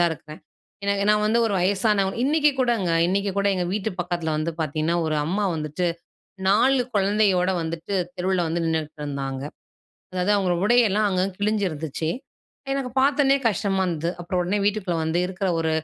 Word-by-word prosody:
தான் 170 -1 +4
இருக்கேன். 155 0 -11 0.4
எனக்கு 200 0 +1
நான் 210 0 +3
வந்து 230 +2 +2
ஒரு 210 - -1
வயசானவ 195 +1 +2
இன்னிக்கு 300 +2 +3
கூடங்க 230 -8 +1 0.2
இன்னிக்கு 195 +2 0
கூட 200 - +1
எங்க 180 -1 -1
வீட்டு 215 +1 -1
பக்கத்தில 175 -2 -2
வந்து 155 +2 -1
பாத்தீங்கன்னா, 155 +2 0
ஒரு 155 -1 0
அம்மா 200 +5 0
வந்துட்டு 155 +3 -2 0.6
4 255 +6 +4
குழந்தையோட 195 -2 +2
வந்துட்டு 165 +4 -5 0.2
தெருவுல 185 0 0
வந்து 170 +1 -1
நின்னுட்டு 160 -1 -2
இருந்தாங்க. 135 -2 -4 0.7
அதாவது 185 +2 +1
அவங்க 190 -3 +1
உடையெல்லா 215 -3 +4
அங்கங்க 185 0 -1
கிழிஞ்சிருந்துச்சு 165 -7 -1 0.6
எனக்கு 275 -2 -2
பாத்தனே 275 0 +4
கஷ்டமா 195 -2 0
இருந்தது. 165 0 -1
அப்புற 175 +2 -6
உடனே 195 +4 0
வீட்டுக்குள்ள 200 -4 0
வந்து 160 +2 0
இருக்கிற 190 +1 -3
ஒரு 160 -1 0
190 Hz, 155 wpm, -24 LUFS, 165-210 Hz, 0.7 s, தான்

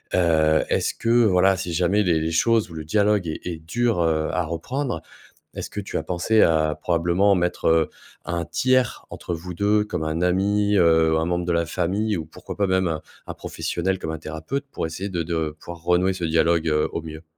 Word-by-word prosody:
heu, 80 -3 +3
est-ce - - 0
que 115 - -3 0.2
voilà, 95 -1 +4
si 90 -2 -4
jamais 90 +5 +2
les 85 -4 +2
les 80 +1 -1
choses 110 +6 +2
ou - - -9
le 80 -1 -6
dialogue 105 +3 +2
est 80 - -4
est 85 -2 -3
dur, 115 +6 0
heu, 80 -1 +1
à 90 -1 0
reprendre, 85 - -3 0.5
est-ce - - -6
que 105 - -4
tu 100 - -6
as - - -3
pensé 90 +6 +2
à 80 -2 +3
probablement 85 +4 +2
mettre, 90 -1 0
heu, 80 -1 +3 0.3
un 85 -1 -2
tiers 125 - +1
entre 85 - -5
vous 90 +2 -7
2, 105 +3 +2
comme 105 - -4
un 80 +1 -2
ami, 100 +3 +2
heu, 80 -2 +4
un 80 - 0
membre 85 0 -1
de 90 - +1
la 85 0 +1
famille 95 +6 -1
ou 80 - -4
pourquoi 80 - -9
pas 100 - +1
même 95 -1 +2
un 80 -2 -3 0.3
un - - -5
professionnel, 95 +2 -3
comme 80 - -4
un 80 - -5
thérapeute, 80 - -5
pour - - -2
essayer 95 +5 -5
de 85 -2 -1
de 80 -2 -2
pouvoir 85 -1 -9
renouer 90 +2 +2
ce 90 -2 -4
dialogue, 80 0 +2
heu, 75 -1 +1
au 85 - -3
mieux? 80 0 -9
85 Hz, 215 wpm, -23 LUFS, 80-95 Hz, 0.5 s, voilà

